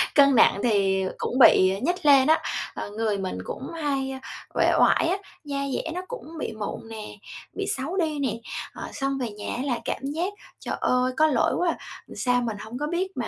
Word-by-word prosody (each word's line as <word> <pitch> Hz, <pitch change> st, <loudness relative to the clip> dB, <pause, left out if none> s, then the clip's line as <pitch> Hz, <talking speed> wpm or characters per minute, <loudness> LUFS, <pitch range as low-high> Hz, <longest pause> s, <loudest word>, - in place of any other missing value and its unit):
Cân 280 Hz, -2 st, +6 dB
nặng 200 Hz, -, +5 dB
thì 195 Hz, -4 st, +2 dB
cũng 255 Hz, -, -2 dB
bị 190 Hz, -5 st, +6 dB
nhích 350 Hz, +3 st, -1 dB
lên 275 Hz, -1 st, +7 dB
á, 315 Hz, -, +4 dB, 0.3 s
ờ, -, -, -5 dB
người 215 Hz, -1 st, -1 dB
mình 190 Hz, -, -3 dB
cũng 265 Hz, -, -6 dB
hay 275 Hz, -4 st, -1 dB, 0.4 s
uể -, -, +3 dB
oải -, -, +4 dB
á, 380 Hz, -, +1 dB, 0.3 s
da 285 Hz, -2 st, -4 dB, 0.2 s
dẻ 325 Hz, -, -2 dB
nó 360 Hz, -, -3 dB
cũng 335 Hz, -10 st, -8 dB
bị 225 Hz, -, -3 dB
mụn 215 Hz, +1 st, -5 dB
nè, 220 Hz, -1 st, -7 dB, 0.4 s
bị 400 Hz, -, -3 dB
xấu 315 Hz, +8 st, -3 dB
đi 310 Hz, -5 st, 0 dB
nè, 265 Hz, -6 st, 0 dB, 0.4 s
ờ, -, -, -7 dB
xong 275 Hz, -1 st, -1 dB
về 245 Hz, -3 st, -2 dB
nhà 205 Hz, 0 st, -5 dB
á 245 Hz, -, -3 dB
là 250 Hz, -4 st, -1 dB
cảm -, -, -2 dB
giác 335 Hz, +8 st, -2 dB, 0.3 s
"Trời -, -, -3 dB
ơi, 250 Hz, 0 st, +2 dB
có 310 Hz, 0 st, +5 dB
lỗi 260 Hz, -6 st, +2 dB
quá 350 Hz, -1 st, +2 dB
à, -, -, 0 dB, 0.4 s
sao 245 Hz, -1 st, +1 dB
mình 225 Hz, -3 st, -3 dB
hổng 220 Hz, +4 st, -7 dB
có 295 Hz, +2 st, -2 dB
biết 370 Hz, +3 st, -2 dB
mà -, -, -2 dB
270 Hz, 215 wpm, -25 LUFS, 225-315 Hz, 0.4 s, lên